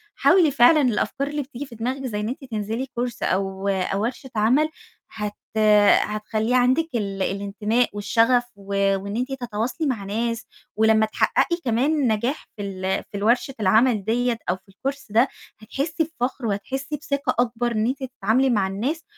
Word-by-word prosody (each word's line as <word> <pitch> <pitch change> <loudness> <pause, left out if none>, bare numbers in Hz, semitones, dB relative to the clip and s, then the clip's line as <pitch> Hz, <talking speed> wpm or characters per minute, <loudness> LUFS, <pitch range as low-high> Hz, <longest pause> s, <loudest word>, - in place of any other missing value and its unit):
حاولي 345 -6 +4
فعلًا 280 +4 +6
الأفكار 265 +2 0
اللي 295 0 -2
بتيجي 280 0 -7
في 250 -4 -12
دماغِك 255 +4 -3
زي 215 -5 -3
إن 210 +1 -2
أنتِ 260 +3 -6
تنزلي 220 +4 -3
course 245 -2 -3
أو 195 +1 -1
أو 195 +1 0
ورشة 255 +3 -4
عمل، 250 +9 +3 0.4
هت 210 -1 -4 0.7
هتخلِّي 215 +3 -1
عندِك 255 +6 +3
ال 200 -3 -2
الانتماء 210 +5 0
والشغف، 230 +4 +3
و 200 0 0
وإن 200 +2 -5
أنتِ 255 +3 -2
تتواصلي 240 +7 -2
مع 235 -7 -2
ناس، 230 +3 -2 0.3
ولمّا 220 0 +4
تحققي 340 +9 +1
كمان 245 +5 +2
النجاح 240 +3 0
في 210 - -7
ال 190 -1 -2
في 205 - -4
الورشة 235 +6 +1
العمل 215 +2 +3
دِيّة 235 +1 0
أو 180 - +2
في 190 +1 -20
الcourse 275 +8 -4
ده، 230 +6 +4 0.3
هتحسّي 290 +8 -2 0.2
بفخر 250 0 -2
وهتحسّي 265 +8 -3
بثقة 280 -1 -2
أكبر 240 0 +1
إن 215 -1 0
أنتِ 265 +2 -2
تتعاملي 255 +1 +1
مع 205 -6 +2
الناس، 255 +12 -3
230 Hz, 165 wpm, -23 LUFS, 210-260 Hz, 0.7 s, فعلًا